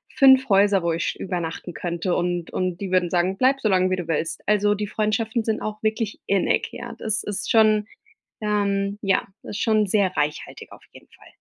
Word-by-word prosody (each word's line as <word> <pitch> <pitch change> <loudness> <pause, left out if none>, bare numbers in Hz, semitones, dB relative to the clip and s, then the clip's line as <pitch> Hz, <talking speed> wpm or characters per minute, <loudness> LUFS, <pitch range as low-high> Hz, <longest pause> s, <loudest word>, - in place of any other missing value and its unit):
5 265 -2 +6
Häuser, 200 -1 +4
wo 170 -1 +1
ich 165 - -2
übernachten 175 -1 -4
könnte 175 +3 -2
und 175 -1 -2
und 185 -2 -2
die 190 -2 -4
würden 180 -2 +2
sagen: 180 +2 0
„Bleib 270 +1 +3
so 215 - +1
lange, 185 -1 +3
wie - - +2
du 175 -2 -5
willst.“ 165 0 -2
Also 210 0 +3
die 205 0 -3
Freundschaften 220 +2 -1
sind 220 -1 -1
auch 215 0 -5
wirklich 215 -1 -1
innig. 195 -1 +1
Ja, - - -8
das 220 0 -2
ist 205 -2 -4
schon, 215 -1 +4 0.5
ähm 200 -1 0
ja, 195 -2 +1 0.2
das - - -8
ist - - -3
schon 215 -2 +3
sehr 190 -2 +1
reichhaltig 150 0 -3
auf - - -14
jeden - - -16
Fall. - - -19
200 Hz, 200 wpm, -23 LUFS, 180-215 Hz, 0.5 s, 5